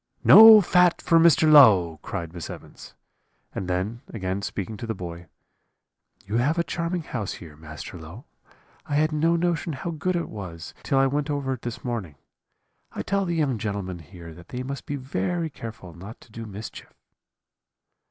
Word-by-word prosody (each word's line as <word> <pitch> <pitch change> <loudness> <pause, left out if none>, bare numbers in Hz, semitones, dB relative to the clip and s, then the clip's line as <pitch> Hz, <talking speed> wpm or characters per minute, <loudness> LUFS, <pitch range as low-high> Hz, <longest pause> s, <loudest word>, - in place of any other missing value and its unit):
"'No 220 -1 +10
fat 180 -1 +3
for 165 - +3
Master 165 -1 +5
Low,' 100 - +6
cried 85 -1 -6
Miss 85 -3 -7
Evans: - - -11 0.6
and 95 - -5
then 95 +6 -3
again 95 -2 -3
speaking 100 +1 -5
to 115 - -7
the 110 - -3
boy, 85 -1 -8 1.0
'You 105 +4 -2
have 145 +7 +1
a 170 - +2
charming 170 0 -3
house 110 -9 -4
here, 80 -3 -12
Master 80 +2 -10
Low; 85 - -11 0.6
I 145 - -2
had 155 +2 +2
no 165 +3 +1
notion 170 -1 -1
how 170 +5 -5
good 175 +4 -2
it 170 - -2
was 90 -5 -8
till 135 - -1
I 135 - +4
went 145 +2 -1
over 140 -2 -2
it 125 - -8
this 120 -1 -6
morning. 110 - -4 0.8
I - - -5
tell 200 0 -1
the 170 -1 -2
young 140 -8 0
gentlemen 100 -4 -4
here 85 0 -12
that 85 +2 -15
they 125 0 -5
must 140 +2 -7
be 145 - -3
very 140 - -3
careful 110 -9 -9
not 95 +7 -11
to - - -19
do 115 +1 -8
mischief.' 105 +2 -10
115 Hz, 180 wpm, -24 LUFS, 90-155 Hz, 1.0 s, No